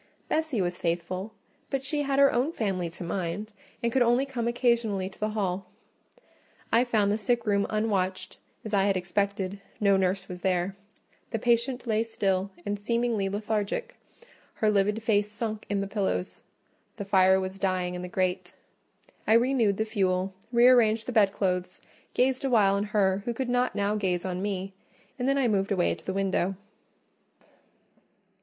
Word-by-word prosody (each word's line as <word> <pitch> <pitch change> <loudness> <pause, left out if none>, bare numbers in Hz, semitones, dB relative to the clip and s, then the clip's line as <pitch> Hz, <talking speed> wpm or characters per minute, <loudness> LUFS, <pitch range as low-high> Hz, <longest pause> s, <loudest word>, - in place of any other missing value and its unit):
Bessie 310 -9 0
was 175 -1 -2
faithful; 180 +4 -2 0.4
but 270 -1 -2
she 290 +2 -1
had 275 -1 0
her 280 0 +6
own 255 +6 +1
family 190 - -2
to 170 +2 -8
mind, 185 +4 -3 0.3
and 235 - +1
could 260 - +2
only 240 +3 +3
come 245 -4 -3
occasionally 235 -5 +1
to - - -18
the 215 - 0
hall. 195 -3 -2 1.0
I 235 +2 +5
found 215 -4 +2
the 210 - 0
sick 235 +2 0
room 200 -1 +2
unwatched, 190 -4 -1 0.3
as 215 - -6
I 195 -1 +3
had 195 -2 +2
expected: 195 +1 -2 0.2
no 200 -2 +4
nurse 190 0 0
was 180 -1 -8
there; 185 +1 0 0.5
the 225 - -2
patient 240 +2 +1
lay 220 -2 +1
still, 195 -4 0 0.2
and 205 0 -2
seemingly 230 -2 0
lethargic; 215 - -2 0.6
her 215 -1 +2
livid 210 +2 +1
face 210 -2 +1
sunk 215 0 -4
in 200 -1 0
the 200 - -3
pillows: 195 -2 -2 0.5
the 200 - -6
fire 190 -1 +5
was 190 +1 -5
dying 185 -2 0
in 180 - -5
the 180 - -5
grate. 180 0 -2 0.7
I 220 - +5
renewed 230 -4 +3
the 220 - 0
fuel, 190 -3 0 0.2
re 240 0 +6
arranged 225 -3 +4
the - - -3
bedclothes, 195 -4 +1 0.4
gazed 260 +1 +2
awhile 220 -7 +4
on 200 +1 0
her 200 -2 +1
who 240 - -2
could 260 +1 -2
not 245 +1 +1
now 205 +1 +1
gaze 185 -4 -1
on 185 0 -3
me, 195 -1 -3 0.5
and 250 - 0
then 275 - +2
I 265 -3 +2
moved 200 -2 0
away 185 -3 +2
to - - -11
the - - -3
window. 195 -1 0
205 Hz, 170 wpm, -27 LUFS, 190-235 Hz, 1.0 s, her